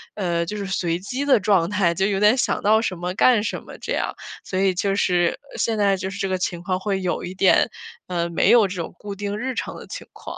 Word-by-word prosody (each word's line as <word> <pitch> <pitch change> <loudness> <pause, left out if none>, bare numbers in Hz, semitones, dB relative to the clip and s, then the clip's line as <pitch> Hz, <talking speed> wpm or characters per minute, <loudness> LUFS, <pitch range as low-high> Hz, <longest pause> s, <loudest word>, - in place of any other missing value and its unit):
呃 170 -4 -1
就 210 - -5
是 200 -1 -4
随 175 -3 -1
机 250 +9 -4
的 285 - +5
状 185 -4 +2
态， 190 -4 +2
就 190 +3 0
有 200 -1 0
点 210 +5 +5
想 - - 0
到 220 +2 +4
什 210 -5 -2
么 180 +1 -3
干 225 +2 +4
什 - - -3
么 - - -11
这 - - -7
样， - - -1 0.3
所 185 - -3
以 190 0 +3
就 195 +2 0
是 175 -3 +1 0.2
现 225 -1 0
在 200 -2 +3
就 190 +1 -4
是 195 - -7
这 195 -1 -2
个 185 - 0
情 175 -1 -3
况 185 +1 -1
会 195 0 -2
有 180 -1 -2
一 180 - -6
点， 190 0 +4 0.4
呃 170 -2 -1
没 170 - +2
有 225 -5 +5
这 185 - -5
种 165 - -7
固 205 -1 -7
定 205 +1 -4
日 260 +4 -3
常 - - -4
的 - - -10
情 - - -8
况。 - - -9
195 Hz, 280 characters per minute, -22 LUFS, 180-205 Hz, 0.4 s, 的